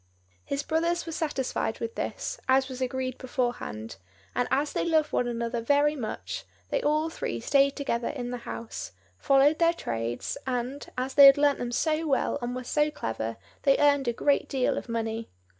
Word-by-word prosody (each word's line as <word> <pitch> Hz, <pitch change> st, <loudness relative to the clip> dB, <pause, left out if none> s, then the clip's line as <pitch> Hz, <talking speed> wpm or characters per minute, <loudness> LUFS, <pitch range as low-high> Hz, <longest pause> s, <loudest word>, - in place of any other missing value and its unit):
His 280 Hz, +1 st, -3 dB
brothers 335 Hz, +3 st, 0 dB
were 330 Hz, -, -5 dB
satisfied 270 Hz, -8 st, -2 dB
with 230 Hz, -1 st, -4 dB
this, -, -, -4 dB
as 265 Hz, 0 st, +4 dB
was 260 Hz, 0 st, -7 dB
agreed 255 Hz, 0 st, -2 dB
beforehand; 240 Hz, -, -3 dB, 0.4 s
and, 245 Hz, -, 0 dB
as 290 Hz, +2 st, +1 dB
they -, -, 0 dB
loved 315 Hz, -3 st, +2 dB
one 245 Hz, -, +1 dB
another 235 Hz, 0 st, -2 dB
very 290 Hz, +5 st, +3 dB
much, 95 Hz, -, -5 dB, 0.3 s
they -, -, +1 dB
all 305 Hz, +2 st, +1 dB
three 115 Hz, -, -3 dB
stayed 275 Hz, -, +3 dB
together 240 Hz, -5 st, -1 dB
in 245 Hz, -4 st, -4 dB
the 245 Hz, -, -4 dB
house, 225 Hz, -, -6 dB, 0.3 s
followed 275 Hz, +3 st, +4 dB
their 335 Hz, 0 st, +4 dB
trades, 115 Hz, -, -3 dB
and, 255 Hz, +2 st, -3 dB
as 260 Hz, +1 st, -2 dB
they 280 Hz, -1 st, +10 dB
had 275 Hz, +1 st, +8 dB
learnt 285 Hz, -1 st, +3 dB
them 240 Hz, -1 st, -3 dB
so 315 Hz, +5 st, 0 dB
well 285 Hz, 0 st, +1 dB
and 240 Hz, +1 st, -3 dB
were 255 Hz, -, -4 dB
so 295 Hz, +4 st, +1 dB
clever, 115 Hz, -, -4 dB, 0.2 s
they 275 Hz, -1 st, +4 dB
earned 285 Hz, -2 st, +3 dB
a -, -, +3 dB
great 285 Hz, +4 st, +1 dB
deal 265 Hz, -2 st, +1 dB
of -, -, -5 dB
money. 225 Hz, 0 st, -3 dB
260 Hz, 185 wpm, -28 LUFS, 235-290 Hz, 0.4 s, they